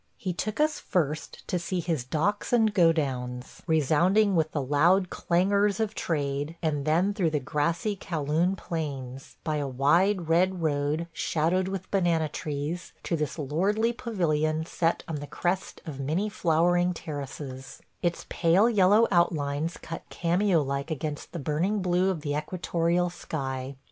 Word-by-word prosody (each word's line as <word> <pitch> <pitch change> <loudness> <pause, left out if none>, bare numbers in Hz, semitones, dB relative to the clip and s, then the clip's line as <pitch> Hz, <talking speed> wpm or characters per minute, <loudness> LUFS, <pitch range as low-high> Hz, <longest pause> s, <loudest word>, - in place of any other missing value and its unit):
He 185 -2 -3
took 215 - -3
us 305 0 +2
first 155 -4 -2
to 180 - 0
see 180 +2 -2
his 165 -6 -1
docks 165 +10 -1
and 225 -3 +3
godowns, 135 -8 0
resounding 175 +7 +3
with 160 -2 +1
the 150 - -1
loud 165 +8 +3
clangors 200 +3 +2
of 220 -1 0
trade, 145 -3 -2
and 150 -4 -1
then 175 +6 +2
through 185 -5 +1
the 150 -1 0
grassy 165 - -1
Kow 165 -5 -4
Loon 165 +6 +1
plains, 135 -7 -5
by 155 -2 -1
a 145 -1 -1
wide 170 +8 +2
red 180 +3 +2
road 150 +2 0
shadowed 170 +5 0
with 190 -1 -5
banana 170 -5 +2
trees, 150 +4 -4
to 170 - -1
this 150 -2 -2
lordly 195 - +1
pavilion 160 -10 0
set 165 0 0
on 160 - -3
the 145 0 -6
crest 185 +5 -2
of 150 -5 -6
many 160 +10 0
flowering 175 -1 +2
terraces 140 -4 -7
– - - -43
its 175 -1 -1
pale 180 +6 +3
yellow 210 0 +5
outlines 160 -2 +1
cut 165 - -7
cameo 175 -1 +2
like 140 +2 -3
against 150 -1 -4
the - - -5
burning 165 +8 0
blue 180 0 +2
of 180 -5 -2
the 145 -1 -2
equatorial 170 +2 0
sky. 135 -5 -4
165 Hz, 155 wpm, -27 LUFS, 150-185 Hz, -, yellow